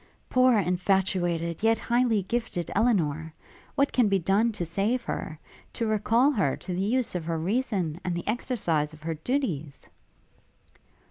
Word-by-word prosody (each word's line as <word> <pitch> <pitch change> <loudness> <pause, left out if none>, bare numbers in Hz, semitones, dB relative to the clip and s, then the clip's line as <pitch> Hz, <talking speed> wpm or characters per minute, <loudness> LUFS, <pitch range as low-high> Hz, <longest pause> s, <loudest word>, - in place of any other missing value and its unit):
poor 255 -2 +5
infatuated, 180 -2 0
yet 225 +1 +3
highly 235 -2 +1
gifted 195 -5 -3
Elinor! 165 -8 +1 0.4
what 280 0 +2
can 245 -4 +4
be 195 - +3
done 195 +6 +2
to 200 -5 -4
save 200 +9 0
her; 155 - -4 0.4
to 230 - -2
recall 225 +5 +3
her 190 - 0
to 180 - -6
the 180 - -1
use 240 +5 0
of 175 -3 -3
her 165 0 -1
reason, 185 - -1
and 180 -2 -2
the 175 - -5
exercise 185 - -1
of 155 0 -14
her 165 0 -2
duties?' 160 - -3
195 Hz, 150 wpm, -27 LUFS, 170-235 Hz, 0.4 s, poor